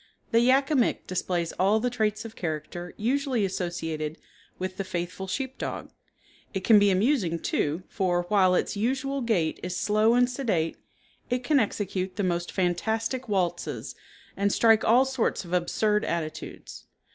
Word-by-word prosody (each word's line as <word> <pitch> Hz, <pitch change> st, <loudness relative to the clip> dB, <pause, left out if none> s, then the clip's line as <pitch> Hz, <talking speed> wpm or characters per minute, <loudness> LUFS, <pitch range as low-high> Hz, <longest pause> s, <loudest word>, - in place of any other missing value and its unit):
The 230 Hz, -, +5 dB
Yak 265 Hz, +4 st, +3 dB
a -, -, +3 dB
Mik 245 Hz, -4 st, +1 dB
displays 175 Hz, -2 st, -1 dB
all 200 Hz, +4 st, +4 dB
the 245 Hz, +2 st, -1 dB
traits 215 Hz, -2 st, -1 dB
of 225 Hz, 0 st, -9 dB
character 170 Hz, +1 st, -5 dB
usually 255 Hz, -1 st, +1 dB
associated 165 Hz, -4 st, -3 dB, 0.4 s
with 185 Hz, 0 st, -4 dB
the 195 Hz, -, -2 dB
faithful 185 Hz, +1 st, -4 dB
sheep 265 Hz, +6 st, -4 dB
dog. -, -, -5 dB, 0.6 s
It 190 Hz, -, -2 dB
can 215 Hz, -1 st, +7 dB
be 205 Hz, 0 st, +4 dB
amusing, 195 Hz, -, +2 dB
too, 160 Hz, +1 st, -1 dB
for, 180 Hz, -3 st, 0 dB
while 185 Hz, -1 st, +3 dB
its -, -, 0 dB
usual 265 Hz, +5 st, -1 dB
gait 190 Hz, -10 st, 0 dB
is 180 Hz, 0 st, -4 dB
slow 215 Hz, +2 st, +3 dB
and 245 Hz, 0 st, +4 dB
sedate, 225 Hz, -, -1 dB, 0.5 s
it 250 Hz, 0 st, -1 dB
can 290 Hz, +2 st, +3 dB
execute 195 Hz, -4 st, -2 dB
the 205 Hz, -, -1 dB
most 175 Hz, -1 st, -1 dB
fantastic 220 Hz, +7 st, -1 dB
waltzes 180 Hz, -4 st, -1 dB, 0.4 s
and 200 Hz, +1 st, +1 dB
strike 225 Hz, 0 st, +4 dB
all 245 Hz, +4 st, +5 dB
sorts 260 Hz, -7 st, -1 dB
of 175 Hz, -, -8 dB
absurd 210 Hz, +4 st, +1 dB
attitudes. 160 Hz, -2 st, -5 dB
200 Hz, 160 wpm, -27 LUFS, 175-235 Hz, 0.6 s, can